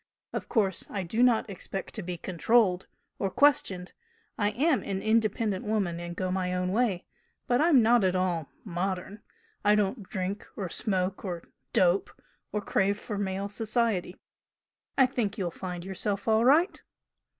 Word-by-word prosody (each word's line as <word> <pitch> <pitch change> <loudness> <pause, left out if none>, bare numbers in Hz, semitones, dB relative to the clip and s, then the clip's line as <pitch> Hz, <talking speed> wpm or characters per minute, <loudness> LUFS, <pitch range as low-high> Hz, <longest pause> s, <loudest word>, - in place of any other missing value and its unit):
Of - - -4
course 195 -6 +1
I 195 -2 -3
do 220 +7 -1
not 245 -3 +4
expect 195 -1 -6
to 215 - -4
be 180 -1 -5
controlled 185 +2 +2 0.3
or 195 - 0
questioned, 195 -9 +2 0.4
I 205 -1 +1
am 275 +5 +2
an 195 -1 -3
independent 215 -2 +1
woman, 200 -6 -1
and 175 0 -6
go 185 0 -2
my 180 -1 -1
own 180 0 -1
way, 210 -4 +1 0.4
but 245 +2 +2
I'm 305 -7 +6
not 235 0 +5
at 185 -1 +2
all 175 -5 0 0.2
'modern.' 190 +2 -3 0.4
I 210 0 +5
don't 210 +3 0
drink 190 +2 -3
or 190 -4 -4
smoke 190 -1 -1
or 175 -4 -4 0.3
'dope,' 180 +1 +2 0.3
or 210 - -1
crave 200 0 +1
for 210 -3 -5
male 195 0 -2
society. 215 -3 -1 0.8
I 265 - +7
think 235 -5 -2
you'll 180 -4 -2
find 180 0 -6
yourself 195 +2 -3
all 220 0 +4
right!" 315 +9 +4
200 Hz, 160 wpm, -28 LUFS, 185-220 Hz, 0.8 s, I